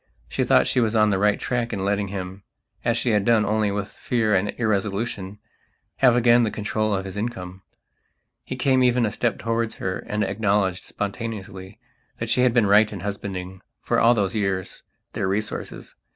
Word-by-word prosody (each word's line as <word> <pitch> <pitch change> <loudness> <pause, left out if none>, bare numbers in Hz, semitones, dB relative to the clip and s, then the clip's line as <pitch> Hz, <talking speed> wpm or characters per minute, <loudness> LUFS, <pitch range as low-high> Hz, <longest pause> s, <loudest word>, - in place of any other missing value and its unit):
She - - -1
thought - - +4
she - - +1
was 115 -2 +1
on 110 -1 +4
the 95 - +1
right 105 +1 +2
tack 120 -2 -2
in 95 -3 -3
letting 100 0 0
himas 95 0 -6 0.5
she 120 +1 0
had 105 -2 +2
done 115 -1 +3
only 105 0 +1
with 100 0 -3
fear 110 -2 -1
and 100 +2 +2
irresolutionhave 105 -1 -2 0.6
again 120 -2 +5
the 115 - +2
control 110 0 -1
of 95 0 -3
his 95 0 -7
income. 95 -4 -5 0.8
He - - -5
came 130 0 +2
even 125 -1 +3
a 105 - -1
step 120 +2 -1
towards 115 0 -2
her 95 0 -3
and 105 0 -2
acknowledged, 100 -2 0
spontaneously, 100 -2 -6 0.4
that - - -4
she 125 - +3
had 125 -1 +4
been 115 -2 +3
right 105 +2 +5
in 100 -4 -6
husbanding, 95 -2 -5 0.2
for - - 0
all 120 +2 +5
those 100 -4 0
years, 95 -4 -2 0.3
their - - -1
resources. 105 +3 -4
105 Hz, 180 wpm, -23 LUFS, 95-115 Hz, 0.8 s, again